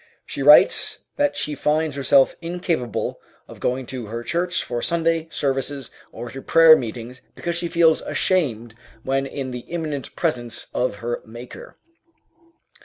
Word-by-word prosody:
She -, -, -6 dB
writes -, -, +5 dB
that 290 Hz, 0 st, +1 dB
she 150 Hz, -, -2 dB
finds 150 Hz, 0 st, 0 dB
herself 140 Hz, 0 st, +4 dB
incapable 165 Hz, -, -2 dB, 0.3 s
of -, -, -12 dB
going 130 Hz, +1 st, -1 dB
to 125 Hz, -4 st, -5 dB
her 115 Hz, +2 st, -5 dB
church 175 Hz, +6 st, -1 dB
for 120 Hz, -1 st, -4 dB
Sunday 165 Hz, 0 st, 0 dB
services 135 Hz, -1 st, -2 dB, 0.2 s
or 120 Hz, -, -8 dB
to 135 Hz, -, -8 dB
prayer 165 Hz, +1 st, +7 dB
meetings 120 Hz, 0 st, -6 dB
because 170 Hz, 0 st, -3 dB
she 170 Hz, 0 st, 0 dB
feels 165 Hz, -2 st, +3 dB
ashamed 120 Hz, -, 0 dB, 0.3 s
when 135 Hz, +1 st, 0 dB
in 135 Hz, -1 st, -5 dB
the 125 Hz, -, -5 dB
imminent 155 Hz, -5 st, -4 dB
presence 120 Hz, -8 st, -2 dB
of 125 Hz, -4 st, 0 dB
her 120 Hz, 0 st, -2 dB
Maker. 120 Hz, +2 st, -11 dB
140 Hz, 145 wpm, -22 LUFS, 125-165 Hz, 0.3 s, prayer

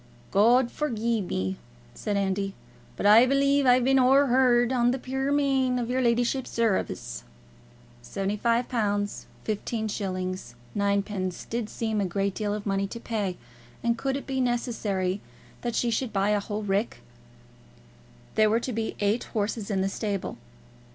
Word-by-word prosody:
"God 235 Hz, +4 st, +4 dB
forgie 235 Hz, -6 st, -1 dB
me," 95 Hz, -, -2 dB, 0.4 s
said 205 Hz, -, -2 dB
Andy, 195 Hz, 0 st, -1 dB, 0.4 s
"but -, -, -3 dB
I 220 Hz, +5 st, +8 dB
b'lieve 275 Hz, 0 st, +3 dB
I've 250 Hz, 0 st, +5 dB
been 270 Hz, +1 st, +4 dB
o'er 270 Hz, +3 st, +5 dB
hard 245 Hz, -1 st, +4 dB
on 240 Hz, -1 st, +3 dB
the 255 Hz, -, +1 dB
puir 265 Hz, +2 st, -2 dB
man 270 Hz, -3 st, +2 dB
in 240 Hz, -2 st, -1 dB
your 255 Hz, +2 st, 0 dB
leddyship's 245 Hz, +2 st, +1 dB
service." 220 Hz, -, -1 dB, 0.8 s
£75 205 Hz, -, -1 dB, 0.2 s
15s. 195 Hz, -, -3 dB, 0.2 s
9d. 200 Hz, -2 st, -1 dB
did 230 Hz, -2 st, -2 dB
seem 220 Hz, -2 st, -1 dB
a -, -, +1 dB
great 195 Hz, +2 st, -1 dB
deal 210 Hz, 0 st, -2 dB
of 210 Hz, -, -6 dB
money 195 Hz, -1 st, 0 dB
to 235 Hz, -, -7 dB
pay; 205 Hz, -6 st, -2 dB, 0.5 s
and 235 Hz, 0 st, +2 dB
could 270 Hz, +3 st, -1 dB
it 280 Hz, -, -7 dB
be 265 Hz, -1 st, -1 dB
necessary 215 Hz, -6 st, -1 dB, 0.4 s
that 240 Hz, -2 st, -2 dB
she 240 Hz, -, +1 dB
should 235 Hz, +1 st, -1 dB
buy 200 Hz, +1 st, +1 dB
a 210 Hz, -, +3 dB
whole 210 Hz, +1 st, -4 dB
rick? 200 Hz, -, -1 dB, 1.3 s
There 215 Hz, -1 st, +4 dB
were 225 Hz, +2 st, +3 dB
to 250 Hz, +1 st, -4 dB
be 220 Hz, 0 st, -2 dB
eight 205 Hz, +4 st, +1 dB
horses 215 Hz, -1 st, -2 dB
in 195 Hz, -2 st, 0 dB
the 190 Hz, -, +1 dB
stable. 200 Hz, -1 st, -3 dB
220 Hz, 150 wpm, -27 LUFS, 200-245 Hz, 1.3 s, I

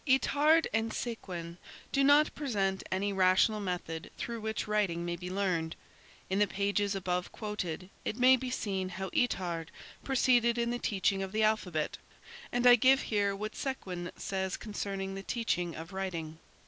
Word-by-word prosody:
Itard 295 Hz, +4 st, +4 dB
and 225 Hz, +1 st, +1 dB
Séquin 180 Hz, -9 st, -5 dB, 0.3 s
do 275 Hz, -, +3 dB
not 290 Hz, +2 st, +5 dB
present 200 Hz, -9 st, -1 dB
any 200 Hz, +2 st, 0 dB
rational 190 Hz, +3 st, +4 dB
method 175 Hz, -4 st, -4 dB
through 235 Hz, -1 st, -4 dB
which 220 Hz, 0 st, -3 dB
writing 195 Hz, -5 st, 0 dB
may 175 Hz, 0 st, -2 dB
be 180 Hz, +1 st, -7 dB
learned. 180 Hz, -4 st, -1 dB, 0.5 s
In 190 Hz, +1 st, 0 dB
the 205 Hz, -, +4 dB
pages 200 Hz, 0 st, 0 dB
above 180 Hz, -1 st, -2 dB
quoted, 185 Hz, -5 st, -4 dB, 0.2 s
it 215 Hz, -, -3 dB
may 255 Hz, +1 st, +7 dB
be 260 Hz, 0 st, -4 dB
seen 190 Hz, -6 st, -2 dB
how 190 Hz, +1 st, -5 dB
Itard 175 Hz, -8 st, 0 dB, 0.4 s
proceeded 245 Hz, -3 st, +3 dB
in 235 Hz, 0 st, +1 dB
the 240 Hz, -, -2 dB
teaching 195 Hz, -2 st, +1 dB
of 190 Hz, -1 st, -4 dB
the 215 Hz, +1 st, +1 dB
alphabet 185 Hz, -8 st, 0 dB, 0.5 s
and 245 Hz, 0 st, 0 dB
I 245 Hz, 0 st, +9 dB
give 265 Hz, +3 st, +5 dB
here 200 Hz, -2 st, +1 dB
what 215 Hz, +2 st, -4 dB
Séguin 185 Hz, -10 st, -4 dB
says 190 Hz, -1 st, -2 dB
concerning 195 Hz, -2 st, -4 dB
the 195 Hz, -, -5 dB
teaching 180 Hz, -6 st, -1 dB
of 165 Hz, +4 st, -8 dB
writing. 165 Hz, -5 st, -4 dB
200 Hz, 160 wpm, -31 LUFS, 185-235 Hz, 0.5 s, I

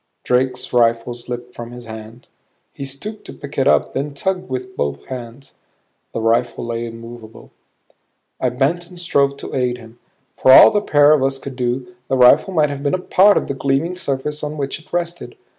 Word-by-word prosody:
Drake's 125 Hz, 0 st, 0 dB
rifle 115 Hz, 0 st, +2 dB
slipped 120 Hz, 0 st, -7 dB
from 120 Hz, -1 st, -8 dB
his 120 Hz, 0 st, -10 dB
hand. 110 Hz, +1 st, -10 dB, 0.5 s
He 140 Hz, -, -6 dB
stooped 145 Hz, +11 st, -6 dB
to -, -, -8 dB
pick 140 Hz, 0 st, -7 dB
it 135 Hz, -, +2 dB
up; -, -, +3 dB
then 140 Hz, +1 st, -3 dB
tugged 185 Hz, +3 st, -2 dB
with 125 Hz, -1 st, -5 dB
both 70 Hz, -1 st, -3 dB
hands. 125 Hz, +1 st, -9 dB, 0.6 s
The -, -, -3 dB
rifle 115 Hz, +1 st, 0 dB
lay 115 Hz, 0 st, -3 dB
immovable. 115 Hz, -1 st, -11 dB, 0.9 s
I 130 Hz, -, +1 dB
bent 145 Hz, +8 st, -1 dB
and 180 Hz, -1 st, -10 dB
strove 140 Hz, -5 st, +1 dB
to -, -, -8 dB
aid 125 Hz, -2 st, 0 dB
him. 115 Hz, 0 st, -15 dB, 0.4 s
For 130 Hz, -, +5 dB
all -, -, +10 dB
the 205 Hz, -, +1 dB
pair 145 Hz, -6 st, +4 dB
of 150 Hz, -, +2 dB
us 135 Hz, 0 st, 0 dB
could 135 Hz, 0 st, -8 dB
do, 125 Hz, 0 st, -3 dB
the 135 Hz, -, 0 dB
rifle 130 Hz, +9 st, +6 dB
might 155 Hz, -5 st, +2 dB
have 140 Hz, -1 st, -5 dB
been 140 Hz, +4 st, +1 dB
a -, -, 0 dB
part 190 Hz, +2 st, +4 dB
of -, -, -1 dB
the -, -, -2 dB
gleaming 140 Hz, +6 st, -1 dB
surface 150 Hz, -3 st, -3 dB
on 150 Hz, +1 st, -4 dB
which 140 Hz, +1 st, -3 dB
it 155 Hz, -, -22 dB
rested. 175 Hz, -, -3 dB
130 Hz, 195 wpm, -19 LUFS, 120-150 Hz, 0.9 s, all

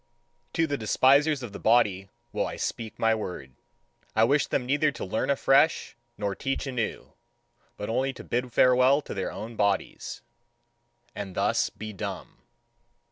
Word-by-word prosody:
To 165 Hz, -, +2 dB
the 145 Hz, -3 st, -2 dB
despisers 140 Hz, +6 st, +3 dB
of 110 Hz, -5 st, -7 dB
the -, -, -7 dB
body 100 Hz, -5 st, +2 dB, 0.2 s
will -, -, -1 dB
I -, -, -6 dB
speak 115 Hz, -2 st, -4 dB
my 115 Hz, 0 st, +3 dB
word. 90 Hz, -, -5 dB, 0.6 s
I 110 Hz, -, +4 dB
wish 140 Hz, +4 st, +3 dB
them 125 Hz, -, -1 dB
neither 145 Hz, +3 st, +2 dB
to -, -, -6 dB
learn 105 Hz, +8 st, -2 dB
afresh, 140 Hz, +3 st, +3 dB, 0.2 s
nor 100 Hz, -1 st, -2 dB
teach 135 Hz, +4 st, -3 dB
anew, 125 Hz, -5 st, -4 dB, 0.6 s
but 105 Hz, -, -5 dB
only 130 Hz, +4 st, 0 dB
to -, -, -10 dB
bid 125 Hz, +1 st, -2 dB
farewell 130 Hz, +4 st, +4 dB
to -, -, -7 dB
their 95 Hz, -2 st, -3 dB
own 115 Hz, +2 st, -7 dB
bodies, 100 Hz, -2 st, -1 dB, 0.9 s
and 100 Hz, -3 st, -6 dB
thus -, -, +1 dB
be 110 Hz, +1 st, -8 dB
dumb. 100 Hz, -1 st, -7 dB
120 Hz, 155 wpm, -27 LUFS, 105-135 Hz, 0.9 s, I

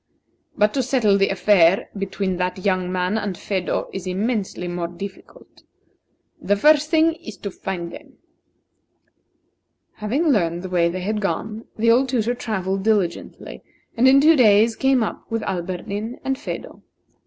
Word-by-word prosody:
But 210 Hz, 0 st, +3 dB
to 275 Hz, -, +1 dB
settle 240 Hz, -5 st, +2 dB
the 195 Hz, 0 st, +2 dB
affair 195 Hz, -2 st, +3 dB
between 195 Hz, -1 st, -3 dB
that 180 Hz, +1 st, -3 dB
young 185 Hz, -2 st, 0 dB
man 185 Hz, +4 st, 0 dB
and 200 Hz, -4 st, -4 dB
Phedo 190 Hz, -3 st, -2 dB
is 190 Hz, -1 st, -6 dB
immensely 195 Hz, -1 st, -2 dB
more 175 Hz, -1 st, -3 dB
difficult. 195 Hz, -, -11 dB, 0.8 s
The 205 Hz, -, +1 dB
first 300 Hz, +7 st, +4 dB
thing 325 Hz, 0 st, +3 dB
is 215 Hz, -3 st, -9 dB
to 200 Hz, +2 st, -6 dB
find 175 Hz, -3 st, -5 dB
them." -, -, -12 dB, 1.8 s
Having 265 Hz, +11 st, 0 dB
learned 175 Hz, -, +1 dB
the 185 Hz, -, -5 dB
way 170 Hz, -2 st, +2 dB
they 185 Hz, +2 st, -4 dB
had 210 Hz, +3 st, -2 dB
gone, 215 Hz, +2 st, -3 dB
the 230 Hz, +1 st, +3 dB
old 255 Hz, +3 st, +3 dB
tutor 240 Hz, -2 st, 0 dB
travelled 195 Hz, -5 st, -3 dB
diligently, 200 Hz, -5 st, -2 dB, 0.3 s
and 245 Hz, +3 st, +4 dB
in 270 Hz, +1 st, +7 dB
two 315 Hz, +3 st, +6 dB
days 225 Hz, -3 st, +5 dB
came 265 Hz, -2 st, +2 dB
up -, -, -6 dB
with 225 Hz, -1 st, -2 dB
Alberdin 190 Hz, +5 st, -4 dB
and 270 Hz, -, -1 dB
Phedo. -, -, -7 dB
205 Hz, 155 wpm, -22 LUFS, 185-235 Hz, 1.8 s, in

